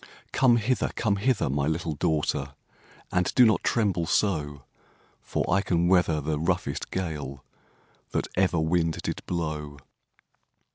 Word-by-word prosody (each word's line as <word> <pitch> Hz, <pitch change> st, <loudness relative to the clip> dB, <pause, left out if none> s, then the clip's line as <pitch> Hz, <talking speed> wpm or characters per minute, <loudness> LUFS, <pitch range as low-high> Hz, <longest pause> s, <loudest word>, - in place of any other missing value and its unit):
'Come 125 Hz, -3 st, +4 dB
hither! 120 Hz, +3 st, 0 dB
come 100 Hz, -3 st, +1 dB
hither! 125 Hz, +3 st, +1 dB
my 70 Hz, +1 st, 0 dB
little 80 Hz, 0 st, -2 dB
daughtèr. 70 Hz, -2 st, -1 dB, 0.6 s
And 90 Hz, 0 st, +1 dB
do 125 Hz, -, +7 dB
not 110 Hz, -, +3 dB
tremble 100 Hz, -8 st, +1 dB
so; 75 Hz, -10 st, 0 dB, 0.6 s
For -, -, -2 dB
I 95 Hz, +2 st, +3 dB
can 85 Hz, -3 st, +1 dB
weather 90 Hz, -4 st, +3 dB
the 75 Hz, +1 st, -2 dB
roughest 85 Hz, -3 st, -1 dB
gale 75 Hz, -7 st, -4 dB, 0.6 s
That -, -, -1 dB
ever 90 Hz, -2 st, +2 dB
wind 80 Hz, 0 st, +1 dB
did -, -, -3 dB
blow.' 75 Hz, -4 st, -3 dB
85 Hz, 135 wpm, -26 LUFS, 75-95 Hz, 0.6 s, do